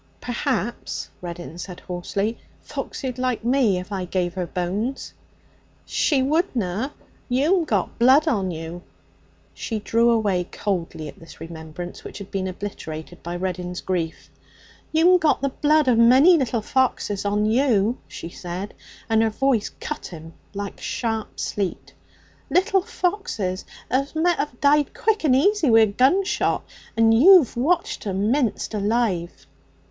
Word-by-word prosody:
'Perhaps,' 240 Hz, -, -3 dB
Reddin 175 Hz, -1 st, -7 dB
said 180 Hz, -1 st, -7 dB
hoarsely, 195 Hz, +5 st, -3 dB, 0.2 s
'Foxy'd 255 Hz, -2 st, -5 dB
like 255 Hz, -3 st, -1 dB
me 240 Hz, -5 st, +3 dB
if 180 Hz, +3 st, -7 dB
I 190 Hz, -2 st, -2 dB
gave 180 Hz, -1 st, -1 dB
her 180 Hz, -2 st, -3 dB
bones.' 200 Hz, +10 st, -3 dB, 0.7 s
'She 275 Hz, -4 st, +1 dB
wouldna! 260 Hz, -, 0 dB, 0.4 s
You'm 315 Hz, +8 st, +2 dB
got -, -, -1 dB
blood 265 Hz, +6 st, +5 dB
on 200 Hz, -10 st, +1 dB
you.' 165 Hz, +1 st, -6 dB, 0.7 s
She 225 Hz, -, -4 dB
drew 230 Hz, +3 st, +2 dB
away 205 Hz, -6 st, +2 dB
coldly 170 Hz, -6 st, -3 dB
at -, -, -11 dB
this 165 Hz, -, -14 dB
remembrance, 165 Hz, +1 st, -8 dB
which -, -, -8 dB
had 200 Hz, -2 st, -9 dB
been 190 Hz, -1 st, -2 dB
obliterated 175 Hz, -4 st, -7 dB
by 170 Hz, +1 st, -5 dB
Reddin's 180 Hz, 0 st, -3 dB
grief. 170 Hz, -4 st, -3 dB, 0.6 s
'You'm 350 Hz, +3 st, +5 dB
got 315 Hz, -2 st, +2 dB
the 275 Hz, -, +2 dB
blood 300 Hz, +2 st, +2 dB
of 240 Hz, -3 st, +4 dB
a -, -, +7 dB
many 265 Hz, +10 st, +7 dB
little 240 Hz, -7 st, 0 dB
foxes 240 Hz, -5 st, 0 dB
on 205 Hz, +1 st, +1 dB
you,' 230 Hz, -1 st, +2 dB
she 165 Hz, -, -8 dB
said, 180 Hz, +4 st, -6 dB, 0.3 s
and 225 Hz, -1 st, +3 dB
her 225 Hz, -, +3 dB
voice 240 Hz, -1 st, +1 dB
cut 300 Hz, -, -5 dB
him 165 Hz, -1 st, -10 dB, 0.2 s
like 200 Hz, 0 st, -5 dB
sharp 225 Hz, -2 st, -3 dB
sleet 195 Hz, -3 st, -3 dB, 0.6 s
'little 375 Hz, +5 st, +3 dB
foxes 355 Hz, -, -2 dB, 0.3 s
as 275 Hz, +4 st, 0 dB
met 345 Hz, +2 st, +2 dB
have 285 Hz, -4 st, -3 dB
died 290 Hz, 0 st, +3 dB
quick 440 Hz, -3 st, +1 dB
and 275 Hz, -5 st, +4 dB
easy 365 Hz, +1 st, +3 dB
wi' 225 Hz, -1 st, +7 dB
a -, -, +7 dB
gunshot. 265 Hz, -, +2 dB, 0.3 s
And 225 Hz, 0 st, +5 dB
you've 315 Hz, -, +7 dB
watched 310 Hz, -1 st, 0 dB
'em 200 Hz, +3 st, 0 dB
minced 255 Hz, -5 st, 0 dB
alive.' 205 Hz, -4 st, -1 dB
225 Hz, 145 wpm, -23 LUFS, 185-275 Hz, 0.7 s, a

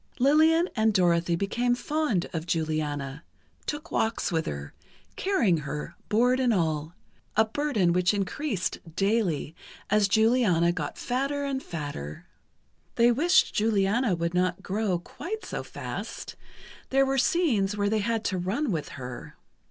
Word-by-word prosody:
Lillian 315 Hz, +6 st, +4 dB
and 220 Hz, -2 st, +2 dB
Dorothy 170 Hz, -2 st, +3 dB
became 240 Hz, +7 st, 0 dB
fond 290 Hz, -, -1 dB
of 165 Hz, 0 st, -4 dB
Juliana, 150 Hz, -3 st, -2 dB, 0.4 s
took 300 Hz, +3 st, -4 dB
walks 220 Hz, -2 st, 0 dB
with 160 Hz, -1 st, 0 dB
her, 70 Hz, -1 st, -5 dB, 0.4 s
carrying 260 Hz, -, +2 dB
her, 150 Hz, 0 st, -5 dB, 0.2 s
board 245 Hz, +4 st, +3 dB
and 250 Hz, -2 st, +3 dB
all—a 165 Hz, +4 st, -1 dB
burden 220 Hz, -8 st, +1 dB
which 180 Hz, 0 st, +3 dB
increased 205 Hz, -, -2 dB, 0.2 s
daily 195 Hz, -6 st, 0 dB, 0.4 s
as 210 Hz, -1 st, +4 dB
Juliana 220 Hz, -6 st, +3 dB
got 155 Hz, -4 st, -4 dB
fatter 275 Hz, +3 st, -1 dB
and 270 Hz, -1 st, -2 dB
fatter. 145 Hz, -, -6 dB, 0.7 s
They 235 Hz, +1 st, +5 dB
wished 345 Hz, +10 st, +3 dB
Juliana 210 Hz, 0 st, +2 dB
would 170 Hz, 0 st, -2 dB
not 180 Hz, +1 st, 0 dB
grow 200 Hz, -2 st, 0 dB
quite 395 Hz, -, -7 dB
so -, -, -4 dB
fast; -, -, -6 dB, 0.5 s
there 270 Hz, +1 st, +4 dB
were 270 Hz, 0 st, +1 dB
scenes 245 Hz, -, +2 dB
where 205 Hz, 0 st, +1 dB
they 215 Hz, +1 st, +1 dB
had 225 Hz, +1 st, -1 dB
to 185 Hz, -, 0 dB
run 220 Hz, +10 st, -1 dB
with 160 Hz, -5 st, -2 dB
her. 125 Hz, -2 st, -8 dB
205 Hz, 135 wpm, -27 LUFS, 170-255 Hz, 0.7 s, They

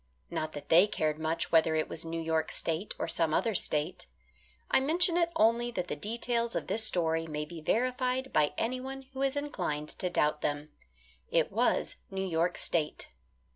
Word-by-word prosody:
Not 155 Hz, 0 st, -3 dB
that 145 Hz, -1 st, -8 dB
they 175 Hz, +5 st, +7 dB
cared 155 Hz, -7 st, -1 dB
much 160 Hz, +1 st, -1 dB
whether 160 Hz, -1 st, +4 dB
it 155 Hz, -, +1 dB
was 165 Hz, -, -5 dB
New 165 Hz, 0 st, -4 dB
York 160 Hz, -1 st, 0 dB
State 165 Hz, +5 st, -2 dB
or -, -, -2 dB
some 160 Hz, -2 st, +1 dB
other 230 Hz, -, +1 dB
state. 155 Hz, -, +1 dB, 0.6 s
I -, -, +6 dB
mentioned 340 Hz, +5 st, +3 dB
it 340 Hz, -1 st, +2 dB
only 235 Hz, -1 st, +3 dB
that 180 Hz, -7 st, -4 dB
the -, -, -1 dB
details 235 Hz, +6 st, -1 dB
of -, -, -1 dB
this 220 Hz, -, -1 dB
story 165 Hz, -4 st, +1 dB
may 150 Hz, -1 st, -3 dB
be 165 Hz, +1 st, -9 dB
verified 255 Hz, +6 st, 0 dB
by 150 Hz, -1 st, +2 dB
anyone 255 Hz, +3 st, -3 dB
who 265 Hz, -, -5 dB
is 275 Hz, 0 st, +1 dB
inclined 155 Hz, -, -3 dB
to 180 Hz, -, -3 dB
doubt 150 Hz, -3 st, +1 dB
them. 145 Hz, +1 st, -2 dB, 0.6 s
It -, -, +2 dB
was -, -, +1 dB
New 190 Hz, 0 st, -3 dB
York 170 Hz, 0 st, 0 dB
State. 155 Hz, -3 st, -2 dB
175 Hz, 180 wpm, -30 LUFS, 155-240 Hz, 0.6 s, they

